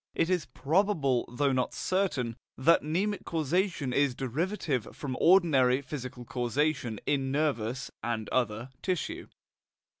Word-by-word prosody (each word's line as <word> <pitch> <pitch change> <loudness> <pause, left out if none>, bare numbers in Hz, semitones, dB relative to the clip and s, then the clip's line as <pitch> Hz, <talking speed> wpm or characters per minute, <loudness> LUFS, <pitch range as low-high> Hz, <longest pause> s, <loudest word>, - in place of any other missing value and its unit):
It 170 - +1
is 180 -5 0
probable, 155 - +1
though 140 +3 +1
not 130 -1 0
certain, 150 - 0 0.2
that 165 +6 +5
mnemic 190 +7 -1
causation 165 -3 0
is 140 -2 +2
derivative 140 - -2
from 135 -3 -4
ordinary 140 -8 +5
physical 130 -3 -6
causation 125 -1 -1
in 135 -2 0
nervous 135 -4 -1
(and 115 -2 -2
other) 120 0 -1
tissue. 185 -4 -2
140 Hz, 120 wpm, -29 LUFS, 125-165 Hz, 0.2 s, that